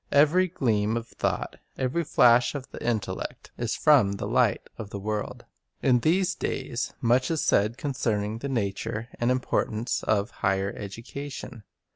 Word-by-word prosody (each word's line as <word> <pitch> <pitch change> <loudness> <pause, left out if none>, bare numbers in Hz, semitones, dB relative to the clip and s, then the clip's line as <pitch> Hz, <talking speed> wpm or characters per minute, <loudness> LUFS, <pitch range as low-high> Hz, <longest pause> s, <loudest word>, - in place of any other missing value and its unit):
Every 155 +6 +5
gleam 110 - 0
of 115 0 -6
thought, - - -2 0.2
every 130 +6 0
Hash 120 +3 +6
of 135 -2 -6
the - - -8
intellect, 105 -5 -3
is 120 -1 -2
from 135 -11 +5
the 100 - -4
Light - - +2
of 105 - -6
the 100 - -5
world. 105 +1 -4 0.4
In 125 -2 +4
these 180 +7 +2
days 130 -6 -3
much 125 +2 +3
is 160 -2 0
said 105 +4 +2
concerning 115 -6 -1
the 140 - -4
nature 110 0 -2
and 120 - +1
importance 120 -2 0
of 105 +1 0
"higher 95 +1 +1
education." 115 +4 -7
120 Hz, 150 wpm, -27 LUFS, 105-135 Hz, 0.4 s, Hash